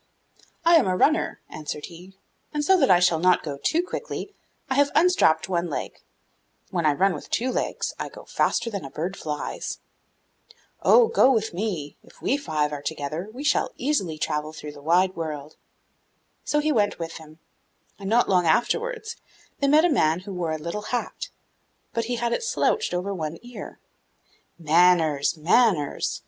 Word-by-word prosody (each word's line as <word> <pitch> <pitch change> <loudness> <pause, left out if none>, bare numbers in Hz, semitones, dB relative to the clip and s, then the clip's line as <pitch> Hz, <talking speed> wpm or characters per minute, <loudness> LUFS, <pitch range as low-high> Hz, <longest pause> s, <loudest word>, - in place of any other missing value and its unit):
'I 335 0 +7
am 305 - +3
a 185 0 +1
runner,' 310 - +2
answered 150 -1 -6
he; 180 +3 -13 0.4
'and 295 -1 -2
so 380 - +5
that 295 -8 +3
I 180 - +6
shall 175 -2 +3
not 180 +1 +3
go 140 -3 -5
too 335 +2 +2
quickly, 410 +1 -6 0.3
I - - -1
have 285 +1 +3
unstrapped 315 - +4
one 175 -2 -1
leg; 145 - -5 0.7
when 170 -4 +1
I 150 - +4
run 190 +5 +2
with 150 - -8
two 255 +3 0
legs, - - -2
I - - -4
go - - -13
faster 230 0 0
than 200 -6 -4
a 135 - -7
bird 175 +7 -4
flies.' 150 -4 -4 1.0
'Oh, 480 -2 +6
go 455 - +4
with 220 -5 0
me; 175 -7 -3
if - - -20
we - - +1
five 155 - -1
are 145 - -5
together, 155 +5 -4
we 255 +5 -8
shall 300 +11 +1
easily 220 - -1
travel 150 0 -2
through 150 -1 -8
the 145 -1 -13
wide 180 +5 +2
world.' 155 -2 -5 0.9
So 295 - +1
he 305 +1 +1
went 205 -6 +1
with 165 -1 -6
him, 155 -1 -14 0.6
and, 195 -1 -5
not 235 +2 +3
long 180 -3 +3
afterwards, 445 - 0 0.4
they 280 - +2
met 305 +4 +5
a - - +3
man 165 - +2
who 195 +1 -8
wore 175 -3 -2
a - - -2
little 170 +7 -5
hat, 250 - -3 0.6
but 230 -1 -1
he 245 +1 -2
had 235 0 -1
it - - -1
slouched 450 - 0
over 190 +3 -2
one 160 -3 -4
ear. 245 0 -9 0.8
'Manners, 165 -2 +3
manners! 170 - +2
185 Hz, 180 wpm, -25 LUFS, 155-255 Hz, 1.0 s, I